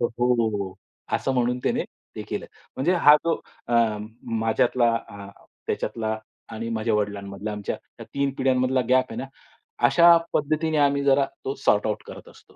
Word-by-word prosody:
तर 120 - +3
"हो." 110 -6 +1 0.4
असं 135 - 0
म्हणून 125 0 +1
त्याने - - +1 0.3
ते - - -4
केलं. - - -4 0.3
म्हणजे 160 +8 +2
हा 150 -4 +7
जो 165 - 0 0.3
अ, 120 - 0 0.7
माझ्यातला, 115 +1 +2
अ, 100 -2 -10 0.4
त्याच्यातला 110 -1 -2 0.3
आणि 115 +1 -4
माझ्या 110 0 0
वडिलांमधला 100 0 -3
आमच्या 105 -1 -4 0.2
या - - -6
3 140 0 +1
पिढ्यांमधला 130 0 +2
गॅप 130 0 +3
आहे - - -7
ना, 135 - -5 0.6
अशा 170 0 +7 0.2
पद्धतीने 155 +1 0
आम्ही 140 -1 +3
जरा 140 0 +4 0.2
तो 135 - -2
सॉर्ट-आउट 105 +1 +2
करत - - -11
असतो. - - -17
125 Hz, 155 wpm, -24 LUFS, 110-140 Hz, 0.7 s, हा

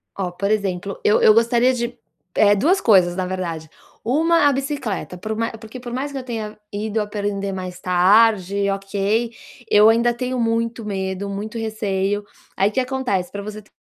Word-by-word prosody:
Ó, 185 -3 -3
por 200 +3 -2
exemplo, 195 -2 -2
eu 210 - +4
eu 215 - +7
gostaria 235 +3 +3
de 240 -1 -3 0.4
eh, 205 -1 +5
2 330 - +3
coisas, 185 -5 +4
na 185 0 -1
verdade. 170 -4 -4 0.3
Uma, 315 +6 +3
a 285 - +3
bicicleta, 265 -9 -3
por 215 +4 -4
ma 230 +1 -1
porque 220 +3 -10
por 240 - -7
mais 270 +4 -3
que 280 - -5
eu 265 - -5
tenha 220 -4 -5
ido 215 +1 -2
aprender 205 -1 -3
mais 185 -1 -6
tarde, 200 +2 +3
ok, 200 +4 -1 0.4
eu 210 +1 +7
ainda 235 +1 +3
tenho 250 +1 -3
muito 230 0 -1
medo, 190 -1 -3
muito 210 +3 -5
receio. 205 -2 -1 0.3
Aí 195 +2 +3
o - - -12
que - - +1
acontece, 255 -8 -1
pra 200 - -5
você 215 +1 -7
te 210 - -26
210 Hz, 180 wpm, -21 LUFS, 195-235 Hz, 0.4 s, eu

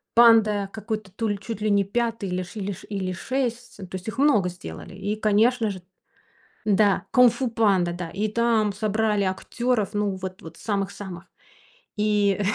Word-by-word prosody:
"Панда", 215 -4 +5
какой-то, 215 -2 -5
то 225 +4 -2
ли, 205 -1 -1
чуть 225 -1 -6
ли 215 - +1
не 200 -1 +4
5 225 0 -2
или 180 0 -1
ш 195 +5 -9
или 200 0 -2
ш 185 - -9
или 190 -3 -2
6. 245 +3 -3
То 190 -2 -8
есть 185 +1 -7
их 220 +2 -5
много 270 -10 +4
сделали, 130 - -9
и, 200 +2 -2
конечно 220 +2 +3
же 185 -2 -6 0.8
Да, 205 -1 +3
"Кунг-фу 250 0 +4
Панда", 200 -6 +2
да. 175 -1 -5
И 210 +4 -1
там 225 -2 +2
собрали 210 0 0
актеров, 210 +3 -1
ну, 205 -1 0
вот 185 0 -7
вот 165 0 -10
самых-самых. 195 -3 -4 0.7
И 210 -2 +2
210 Hz, 165 wpm, -24 LUFS, 190-225 Hz, 0.8 s, Панда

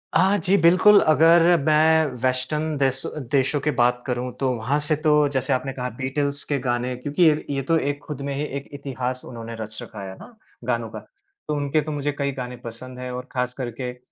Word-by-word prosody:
हाँ 190 +4 +4
जी, 190 +1 +2
बिल्कुल 185 +5 +7
अगर 165 +3 +6 0.2
मैं 155 +1 +4 0.2
वेस्टर्न 145 +5 -1
देश 135 -1 +1 0.3
देशों 140 +1 +2
की - - +4
बात 125 -1 +2
करूँ 125 0 -2
तो 135 -1 +1
वहाँ 120 +6 0
से 155 - +2
तो 155 - +5 0.2
जैसे 130 0 0
आपने 135 +1 -2
कहा 125 -1 -3
बीटल्स 140 +2 -1
के 145 - +1
गाने, 125 0 -1
क्योंकि 145 +7 0
ये 155 -2 +4
ये 140 -1 -1
तो 165 - +4
एक 145 -1 -1
खुद 145 -2 -6
में 140 0 -3
ही 140 - -2 0.2
एक 140 - -8
इतिहास 130 -2 -4
उन्होंने 115 -1 -7
रच 110 0 -6
रखा 100 -2 -8
है 95 - -9
ना, 240 - -13 0.3
गानों 115 -2 -1
का। - - -7
तो 395 - -9
उनके 145 +1 +1
तो 155 - -5
मुझे 145 0 -1
कई 140 -1 0
गाने 125 0 -6
पसंद 125 +2 -8
है 125 0 -5
और 125 0 -6
ख़ास 125 -1 -1
करके 125 +1 -4
अ, 125 - -15
135 Hz, 210 wpm, -23 LUFS, 125-150 Hz, 0.3 s, बिल्कुल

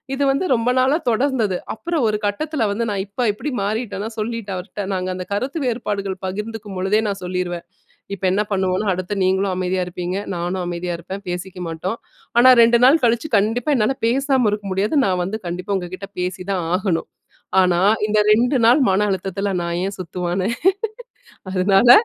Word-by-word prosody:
இது 280 - 0
வந்து 275 +7 0
ரொம்ப 235 +1 +1
நாளா 270 +4 +3
தொடர்ந்தது. 230 -6 +1 0.2
அப்பறம் 320 +1 -1
ஒரு 210 0 0
கட்டத்துல 235 +3 -1
வந்து, 230 +3 -1
நான் 195 -1 -1
இப்ப 235 +4 -1
எப்படி 290 +8 -4
மாறிட்டேன்னா, 215 0 -2
சொல்லிட்டேன் 215 -3 -3
அவர்ட 195 +2 -5
நாங்க 185 0 -2
அந்த 180 0 -5
கருத்து 270 +10 -2
வேறுபாடுகள் 200 -5 -2
பகிர்ந்துக்கும் 210 0 -5
பொழுதே 200 +4 +2
நான் 195 -1 -4
சொல்லிருவேன். 180 -1 -3 0.5
இப்ப 195 - -18
என்ன 205 +2 +2
பண்ணுவோம்னா, 190 +2 0
அடுத்த 185 +2 -4
நீங்களும் 190 +1 +1
அமைதியா 185 0 0
இருப்பீங்க, 180 +1 -4 0.2
நானும் 180 +2 -2
அமைதியா 175 0 -3
இருப்பேன், 190 +4 -7
பேசிக்கமாட்டோம். 180 +1 -4 0.4
ஆனா 255 +2 +8
2 235 +1 +5
நாள் 300 +5 +6
கழிச்சு 235 +6 +1
கண்டிப்பா 225 +8 +1
என்னால 230 +4 +1
பேசாம 265 -1 +2
இருக்க 210 0 -3
முடியாது, 205 +10 0
நான் 180 -1 +1
வந்து 215 +4 -4
கண்டிப்பா 180 +4 -3
உங்ககிட்ட 185 +2 -6
பேசிதான் 185 0 -2
ஆகணும். 185 -3 -1 0.5
ஆனா 180 -1 +3 0.3
இந்த 215 0 +1
2 245 +5 +4
நாள் 245 +6 +6
மன 195 +2 +3
அழுத்தத்துல 195 +1 -2
நான் 170 0 -2
ஏன் 195 +1 -3
சுத்துவானே? 180 +2 -2 1.0
அதனால, 195 +5 +4
200 Hz, 160 wpm, -21 LUFS, 185-230 Hz, 1.0 s, ஆனா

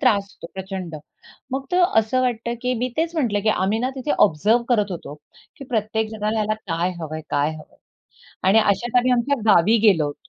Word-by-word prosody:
त्रास 210 -7 +3
होतो, - - -11
प्रचंड. 190 -3 -6 0.6
मग 265 +1 -2
तो 360 0 +3 0.2
असं 225 +4 -1
वाटतं 235 -1 -1
की 250 0 0
मी 250 +2 -1
तेच 330 +1 -1
म्हटलं 235 -10 0
की 220 - +1
आम्ही 205 +1 +1
ना 250 +3 -1
तिथे 265 +3 -4
ऑब्झर्व्ह 210 +7 +3
करत 210 -5 +2
होतो, 170 -5 -7 0.4
की 275 - -9
प्रत्येकजणाला 220 -1 -1
ना 215 - +2
काय 170 +2 0
हवंय? 155 -1 -5
काय 145 +1 +1
हवंय? 155 -1 -13 0.7
आणि 195 +4 +5
अशात 220 +3 +1
आम्ही 250 +1 +4
आमच्या 250 +4 +1 0.2
गावी 195 +7 +5
गेलो 160 -7 +3
होतो. 145 +4 -9
215 Hz, 185 wpm, -22 LUFS, 190-245 Hz, 0.7 s, आणि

